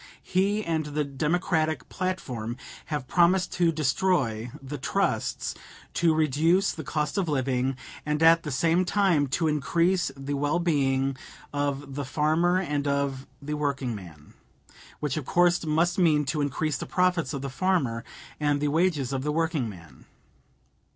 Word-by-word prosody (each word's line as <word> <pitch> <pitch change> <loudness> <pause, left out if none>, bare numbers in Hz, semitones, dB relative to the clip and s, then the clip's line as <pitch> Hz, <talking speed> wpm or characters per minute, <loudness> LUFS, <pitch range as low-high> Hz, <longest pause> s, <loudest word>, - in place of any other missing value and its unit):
He 200 +3 +1
and 160 -1 0
the 150 0 -1
Democratic 155 +3 0
platform 125 - -3 0.3
have 145 -5 -4
promised 180 +3 +3
to 170 -2 +2
destroy 135 -6 0
the 135 +1 -7
trusts, - - -1 0.4
to 165 -2 +3
reduce 160 +6 +3
the 160 - -7
cost 150 +6 -1
of 180 -4 -1
living, 130 -2 0 0.3
and 150 +1 0
at 165 +1 +7
the 150 - -5
same 165 +6 +2
time 180 -6 +2
to 160 +5 0
increase 170 +5 +1
the 135 +1 -4
well 145 +3 +1
being 135 -5 +1 0.4
of 145 -1 -2
the 145 +1 -3
farmer 155 +6 +2
and 150 -5 -2
of 140 -1 -1 0.2
the 150 +2 -3
workingman 120 - -4 0.7
which 150 -1 -1
of 150 - -3
course 175 0 +3
must 170 +4 +2
mean 155 -4 +4
to 145 +2 -1
increase 145 +1 -1
the - - -6
profits 180 -2 +1
of 140 -3 -4
the - - -2
farmer 135 -9 0 0.4
and 145 -1 +1
the 145 0 0
wages 150 -5 +1
of 135 - -1
the 150 +2 -1
workingman. 120 - -3
150 Hz, 150 wpm, -27 LUFS, 135-170 Hz, 0.7 s, at